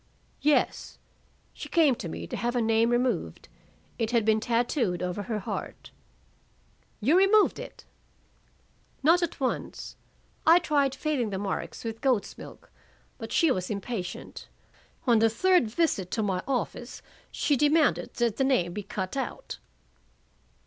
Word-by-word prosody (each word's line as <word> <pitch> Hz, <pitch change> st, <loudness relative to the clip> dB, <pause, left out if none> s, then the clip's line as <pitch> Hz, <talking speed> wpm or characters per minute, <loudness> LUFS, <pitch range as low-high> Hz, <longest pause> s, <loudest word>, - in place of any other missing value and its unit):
"Yes. 300 Hz, 0 st, +1 dB, 0.6 s
She -, -, -9 dB
came 315 Hz, -5 st, +4 dB
to 175 Hz, -, -6 dB
me -, -, -6 dB
to -, -, -6 dB
have 240 Hz, +1 st, -2 dB
a -, -, +2 dB
name 225 Hz, +1 st, +3 dB
removed. 240 Hz, -, -1 dB, 0.5 s
It 225 Hz, -2 st, 0 dB
had 230 Hz, -3 st, +2 dB
been 220 Hz, 0 st, +3 dB
tattooed 230 Hz, -, 0 dB
over 180 Hz, +3 st, -3 dB
her 215 Hz, +2 st, -3 dB
heart." 200 Hz, -, -6 dB, 1.1 s
"You 270 Hz, +10 st, +3 dB
removed 390 Hz, +3 st, +4 dB
it?" -, -, -10 dB, 1.2 s
"Not 335 Hz, +5 st, +5 dB
at 345 Hz, -, -3 dB
once. 260 Hz, -2 st, -3 dB, 0.5 s
I 330 Hz, +2 st, +7 dB
tried 285 Hz, -6 st, +1 dB
fading 275 Hz, -5 st, -1 dB
the 195 Hz, -, -3 dB
marks 195 Hz, 0 st, -4 dB
with 225 Hz, -1 st, -5 dB
goat's 255 Hz, -7 st, 0 dB
milk, -, -, -12 dB, 0.5 s
but -, -, -7 dB
she 330 Hz, -5 st, +3 dB
was 185 Hz, -5 st, -2 dB
impatient. 200 Hz, -2 st, -5 dB, 0.6 s
On 235 Hz, -4 st, +4 dB
the 225 Hz, 0 st, +4 dB
third 355 Hz, +4 st, +3 dB
visit 215 Hz, -, 0 dB
to 220 Hz, -, +1 dB
my 190 Hz, -3 st, -1 dB
office 250 Hz, -2 st, -3 dB, 0.3 s
she 290 Hz, -, +1 dB
demanded 295 Hz, +3 st, +2 dB
that 235 Hz, -3 st, 0 dB
the 270 Hz, -, +2 dB
name 245 Hz, -11 st, +1 dB
be 210 Hz, -, -4 dB
cut 190 Hz, 0 st, -5 dB
out." 270 Hz, -2 st, -5 dB
240 Hz, 145 wpm, -27 LUFS, 210-290 Hz, 1.2 s, I